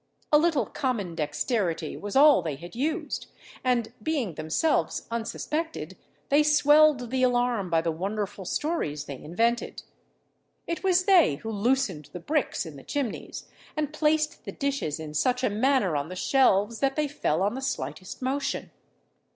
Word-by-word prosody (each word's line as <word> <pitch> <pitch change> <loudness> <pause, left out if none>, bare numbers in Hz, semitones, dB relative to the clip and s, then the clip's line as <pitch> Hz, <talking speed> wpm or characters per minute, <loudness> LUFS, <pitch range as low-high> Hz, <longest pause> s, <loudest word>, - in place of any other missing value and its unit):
A 300 - +7
little 305 -7 +2
common 215 - -2
dexterity 165 - -1
was 205 0 -6
all 290 +2 +7
they 155 -4 -3
had 170 +7 -11
used; 310 +5 -2 0.4
and, 240 -3 +1
being 280 - -1
themselves 155 - 0
unsuspected, 300 +8 -3 0.3
they 285 +2 +5
swelled 295 -4 +4
the 260 0 0
alarm 245 -6 +1
by 165 -1 +3
the 165 0 -1
wonderful 200 +4 -3
stories 175 - -2
they 140 -3 -7
invented. 230 +9 -1 0.8
It 335 - -4
was 370 -1 +3
they 360 - +5
who 220 +10 -6
loosened 210 - 0
the 180 - -5
bricks 295 - -1
in 155 -3 -9
the 135 - -12
chimneys, 275 -6 -4 0.3
and 305 -1 -1
placed 305 0 +1
the - - -6
dishes 275 - -2
in 155 -1 -7
such 250 +11 +1
a 220 - +2
manner 225 - +2
on 145 +2 -2
the 185 - -6
shelves, 225 -1 +2
that 270 -1 +1
they 305 -1 +1
fell 190 - 0
on 205 +2 +1
the 265 - -5
slightest 255 -5 -4
motion. 275 +2 -2
245 Hz, 160 wpm, -27 LUFS, 180-290 Hz, 0.8 s, A